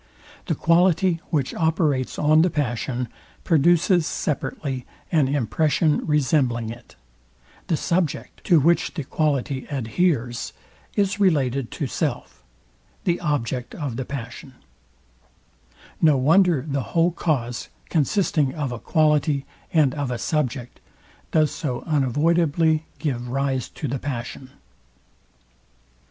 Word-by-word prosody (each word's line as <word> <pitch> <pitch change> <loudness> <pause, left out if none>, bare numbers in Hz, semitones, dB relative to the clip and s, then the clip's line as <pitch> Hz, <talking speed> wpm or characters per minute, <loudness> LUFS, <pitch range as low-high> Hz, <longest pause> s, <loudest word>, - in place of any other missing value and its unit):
The - - 0
quality, 170 0 +3
which 145 -6 0
operates 160 -5 0
on 155 +1 +4
the 180 - +3
passion, 125 -4 -2 0.4
produces 170 +1 +3
separately 135 -3 -3 0.3
an 155 -6 +3
impression 145 +4 +1
resembling 130 -6 +1
it; 120 0 -13 0.7
the 165 - +1
subject, 170 -3 -2
to 170 -4 +5
which 170 +5 +2
the 155 - -3
quality 140 -2 -1
adheres, 130 -1 -1 0.4
is 200 0 +1
related 140 - +2
to 145 - -3
self, 125 - -3 0.6
the 175 -1 +1
object 130 -6 -2
of 140 -7 -4
the 130 - -3
passion: 130 0 -7 1.5
No 155 -4 +5
wonder 160 +1 +4
the 140 -2 -1 0.2
whole 170 +2 +4
cause, 125 -9 -2 0.2
consisting 155 -3 +1
of 145 -5 -2
a 120 - -5
quality 150 -2 +2 0.3
and 150 -5 +3
of 145 -3 -3
a 125 - -2
subject, 130 -2 -2 0.5
does 155 -2 +2
so 130 -7 -4
unavoidably 160 +2 +2
give 125 -6 -3
rise 135 0 -1
to 150 - -5
the 135 +1 -2
pass 120 -4 -4
on. 130 - -13
145 Hz, 115 wpm, -23 LUFS, 130-165 Hz, 1.5 s, to